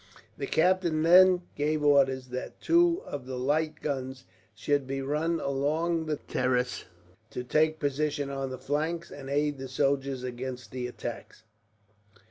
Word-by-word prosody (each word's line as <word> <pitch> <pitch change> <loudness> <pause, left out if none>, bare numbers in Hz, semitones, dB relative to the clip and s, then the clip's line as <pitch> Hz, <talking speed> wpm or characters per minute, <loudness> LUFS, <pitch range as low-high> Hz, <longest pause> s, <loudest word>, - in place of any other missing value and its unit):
The - - -4
captain 170 -2 +2
then 180 +1 +7
gave 150 +1 0
orders 135 -3 +3
that 125 +1 -6
two 345 +2 +3
of 135 -3 -6
the 130 -1 -4
light 155 +4 -1
guns 130 -2 -3 0.3
should 145 -2 0
be 135 0 -3
run 155 +5 -1
along 155 +4 0
the 155 - 0
terrace, 125 -2 -1 0.4
to 125 - -5
take 155 +5 +2
position 145 -1 -1
on 135 -1 -3
the 130 - -6
flanks, 155 +6 -2
and 135 -1 -8
aid 145 0 0
the 135 - -5
soldiers 135 0 0
against 125 0 -6
the 125 -1 -3
attacks. 120 -2 -7
140 Hz, 145 wpm, -28 LUFS, 130-155 Hz, 0.4 s, then